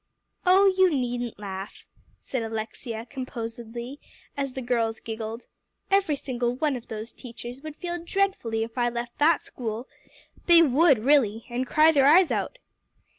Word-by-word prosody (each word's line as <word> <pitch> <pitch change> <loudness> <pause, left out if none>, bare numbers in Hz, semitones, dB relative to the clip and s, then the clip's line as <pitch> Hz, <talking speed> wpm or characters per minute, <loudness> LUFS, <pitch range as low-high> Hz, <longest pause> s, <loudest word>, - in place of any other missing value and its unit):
"Oh, 380 +2 +6
you 375 -1 +5
needn't 245 -5 -2
laugh," 195 0 -7 0.3
said 260 - -4
Alexia 225 +1 -5
composedly 240 0 -6 0.4
as 275 -2 -3
the 265 - -5
girls 230 -2 0
giggled; 225 +1 -6 0.5
"every 390 -6 +3
single 245 -3 -2
one 295 0 0
of 240 - -8
those 220 +1 -6
teachers 240 +1 -10
would 310 -1 -8
feel 345 0 -5
dreadfully 340 - 0
if 230 +2 -6
I 240 0 +2
left 240 0 -6
that 310 +2 +4
school. 235 +1 -5 0.6
They 340 -1 +8
would 290 0 +5
really, 230 -3 +2
and 250 +2 -2
cry 310 +4 +5
their 275 -3 +4
eyes 345 +4 +6
out." - - -2
245 Hz, 150 wpm, -26 LUFS, 230-295 Hz, 0.6 s, They